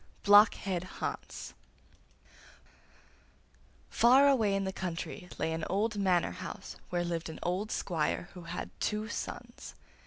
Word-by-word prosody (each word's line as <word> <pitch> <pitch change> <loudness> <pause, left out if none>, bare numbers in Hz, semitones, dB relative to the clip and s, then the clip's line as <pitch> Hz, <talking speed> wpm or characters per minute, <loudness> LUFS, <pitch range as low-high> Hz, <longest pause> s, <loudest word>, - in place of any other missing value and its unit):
BLOCKHEAD 200 -3 +5 0.2
HANS - - -5 2.4
Far 260 +4 +6
away 225 -8 +3
in 195 - 0
the 190 0 -3
country 180 0 -5
lay 160 0 -1
an 160 0 -3
old 210 +4 0
manor 185 -3 +2
house 185 -2 -7
where 175 -1 0
lived 165 -1 -3
an 160 - -7
old 185 +5 -1
squire 170 0 -1
who 180 -3 -10
had 170 +1 -5
two 215 0 -1
sons. - - -6
185 Hz, 125 wpm, -31 LUFS, 175-210 Hz, 2.4 s, Far